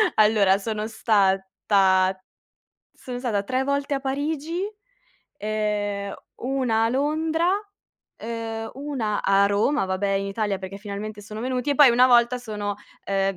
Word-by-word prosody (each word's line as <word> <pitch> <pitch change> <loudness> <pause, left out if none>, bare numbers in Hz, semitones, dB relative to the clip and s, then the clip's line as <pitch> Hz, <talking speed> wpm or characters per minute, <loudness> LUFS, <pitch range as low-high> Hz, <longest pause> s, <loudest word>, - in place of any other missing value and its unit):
Allora 210 -3 +4
sono 215 +1 -3
stata 190 -3 +2 0.8
sono 250 -2 -7
stata 225 -6 -1
tre 260 +5 -1
volte 280 0 -1
a 275 - -1
Parigi, 295 +5 -2 0.7
ehm, 205 -1 -2 0.3
una 250 -4 +1
a - - +2
Londra, 315 +6 0 0.7
ehm, 225 0 -5
una 265 -7 -2
a 195 0 +4
Roma, 205 +5 +1
vabbè, 190 +1 -1
in 195 0 0
Italia 200 -1 -2
perché 190 +1 -7
finalmente 205 +1 -6
sono 215 +1 -8
venuti. 255 +2 -1
E - - +2
poi 285 -4 +8
una 250 +2 +5
volta 240 0 +5
sono, 210 -4 -4 0.3
ehm, 195 -1 0
220 Hz, 135 wpm, -24 LUFS, 200-260 Hz, 0.8 s, poi